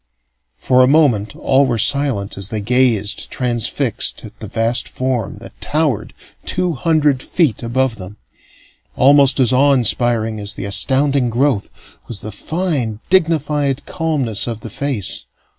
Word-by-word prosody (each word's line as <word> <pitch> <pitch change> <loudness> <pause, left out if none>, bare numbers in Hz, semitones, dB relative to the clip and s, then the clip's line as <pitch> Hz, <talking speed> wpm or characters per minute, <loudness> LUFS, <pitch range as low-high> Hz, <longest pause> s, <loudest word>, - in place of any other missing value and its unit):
For 125 - +2
a 125 - +5
moment 130 -9 +2
all 135 0 +2
were 120 -2 -1
silent 135 -5 +1
as 100 -1 0
they 110 - -3
gazed, 115 -2 0
transfixed, 120 -3 0
at - - -13
the - - -7
vast 115 +2 +2
form 130 -5 -3
that - - -13
towered 140 -7 -1 0.3
two 180 -1 -1
hundred 150 -2 +1
feet 155 -7 0
above 120 0 -1
them. 100 +2 -9 0.8
Almost 140 0 +4
as 130 -2 +3
awe 140 +2 +4
inspiring 115 -3 0
as 100 0 0
the - - -6
astounding 130 +5 +1
growth 120 -2 0 0.4
was 115 -5 -6
the 110 - -7
fine, 150 - -3
dignified 150 -6 +1
calmness 140 - -1
of 115 -2 -5
the 110 - -8
face. 135 -8 -1
125 Hz, 140 wpm, -17 LUFS, 110-145 Hz, 0.8 s, a